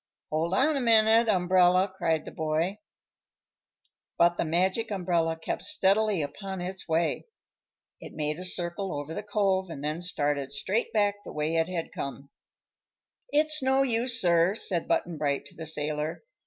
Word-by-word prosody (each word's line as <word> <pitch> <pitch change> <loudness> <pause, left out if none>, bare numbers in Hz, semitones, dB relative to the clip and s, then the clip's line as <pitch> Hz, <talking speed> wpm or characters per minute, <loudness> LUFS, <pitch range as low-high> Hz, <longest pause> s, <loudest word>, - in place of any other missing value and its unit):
"Hold 165 +4 0
on 295 +8 +3
a 275 - 0
minute, 225 0 +4
Umbrella!" 185 -1 +4
cried 160 -4 0
the - - -8
boy. 160 +5 -1 1.4
But 170 0 +4
the - - -1
Magic 185 +7 0
Umbrella 175 -5 0
kept 160 - -4
steadily 210 - +2
upon 190 +7 -6
its 185 0 -6
way. 165 - 0 0.7
It - - -11
made 150 +1 -2
a - - -5
circle 180 -1 -2
over 145 +2 -6
the - - -4
Cove 195 -3 0
and 145 -4 -7
then 155 +3 -2
started 145 -5 -1
straight 185 +11 -1
back 205 -2 +1
the - - -9
way 150 +2 -2
it 165 +1 +1
had 170 -3 -4
come. 140 0 -6 1.0
"It's 305 - +2
no 265 +1 +3
use, 235 -1 +2
sir," 175 +2 +3
said 180 -6 0
Button 165 -3 -1
Bright 140 -2 -1
to - - -13
the 160 -1 -7
sailor. 150 0 -3
180 Hz, 160 wpm, -27 LUFS, 160-205 Hz, 1.4 s, minute